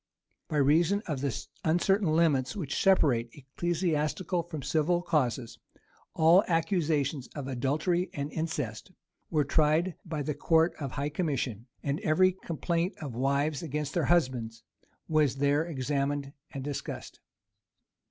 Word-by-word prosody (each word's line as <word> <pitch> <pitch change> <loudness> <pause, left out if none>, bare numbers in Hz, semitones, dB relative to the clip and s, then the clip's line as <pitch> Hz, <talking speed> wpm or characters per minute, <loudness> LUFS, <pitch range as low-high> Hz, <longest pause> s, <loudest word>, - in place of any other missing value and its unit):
By 155 - -2
reason 165 +8 +3
of 145 -6 -3
the 140 -1 0 0.3
uncertain 175 +1 +2
limits 145 -6 +2
which 155 -9 -2
separate 135 -11 +3
ecclesiastical 165 +4 -1
from 160 -4 -7
civil 160 +5 +1
causes, 130 -8 -1 0.6
all 170 +5 +6
accusations 160 -6 0
of 140 -3 -5
adultery 150 +8 0
and 145 +1 -4
incest 150 - -4 0.4
were 155 -3 +2
tried 155 +5 +2
by 160 -4 -4
the 150 - -2
court 160 +3 +3
of 140 -4 -4
high 145 +1 -2
commission; 135 - -2 0.2
and 140 +2 -1
every 185 -1 +4
complaint 170 0 -2
of 145 -6 -6
wives 140 +4 0
against 150 -2 -3
their 170 -5 +1
husbands 125 -9 +1 0.4
was 150 -4 +2
there 145 +2 +2
examined 140 -1 -2 0.2
and 135 -2 -6
discussed. 145 0 -6
150 Hz, 130 wpm, -29 LUFS, 140-170 Hz, 0.6 s, all